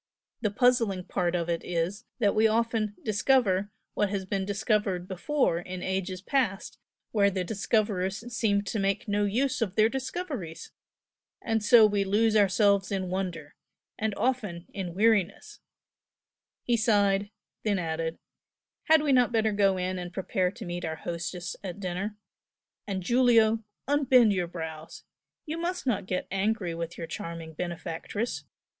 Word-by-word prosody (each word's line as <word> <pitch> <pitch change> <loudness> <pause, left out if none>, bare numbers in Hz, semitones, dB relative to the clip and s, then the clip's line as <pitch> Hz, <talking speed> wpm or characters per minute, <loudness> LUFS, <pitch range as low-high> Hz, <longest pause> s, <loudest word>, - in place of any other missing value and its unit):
The 215 - +1
puzzling 230 -4 +2
part 180 -1 -1
of 170 -1 -1
it 170 -1 -1
is 180 +6 -2
that 205 -5 +2
we 220 +1 +4
often 225 -1 0
'discover' 205 -3 +2 0.2
what 210 - +1
has 195 -1 -3
been 190 0 -2
discovered 205 -3 0
before 185 - 0
in 180 +1 -7
past 190 +4 -1
ages - - -24 0.3
where 200 -2 +4
the 185 -1 -2
discoverers 205 +1 -1
seemed 205 -3 +1
to 215 - -2
make 195 +1 0
no 205 0 +1
use 255 +6 0
of 200 -4 -1
their 220 0 +5
discoveries! 265 - -5 0.7
and 225 -2 -1
so 225 +1 +8
we 205 -1 +2
lose 215 +3 +2
ourselves 200 0 +3
in 190 -2 -2
wonder 175 -6 -4 0.5
and 220 -2 -1
often 210 -8 -1
in 180 -4 -5
weariness!" 205 -2 +1 1.0
He 240 -1 +2
sighed, 205 -3 +2 0.3
then 205 -2 +1
added 165 -1 -2 0.7
"Had 315 -1 +5
we 290 - +2
not 250 -2 +4
better 220 -2 +2
go 200 -2 +3
in 185 0 -2
and 175 -1 -6
prepare 185 0 0
to 220 +3 -9
meet 175 0 -4
our 160 -1 -2
hostess 170 +1 -5
at 185 0 -6
dinner? 195 +3 -3 0.7
And 190 -2 -3
Giulio! 230 0 +4 0.2
unbend 260 -6 +5
your 180 -2 -1
brows! 160 -2 -7 0.4
you 320 +2 -4
must 355 0 -3
not 210 -7 0
get 185 -1 -2
angry 195 -2 0
with 170 +1 -5
your 165 - -4
charming 165 -1 -6
benefactress! 175 +6 -4
200 Hz, 150 wpm, -28 LUFS, 180-225 Hz, 1.0 s, so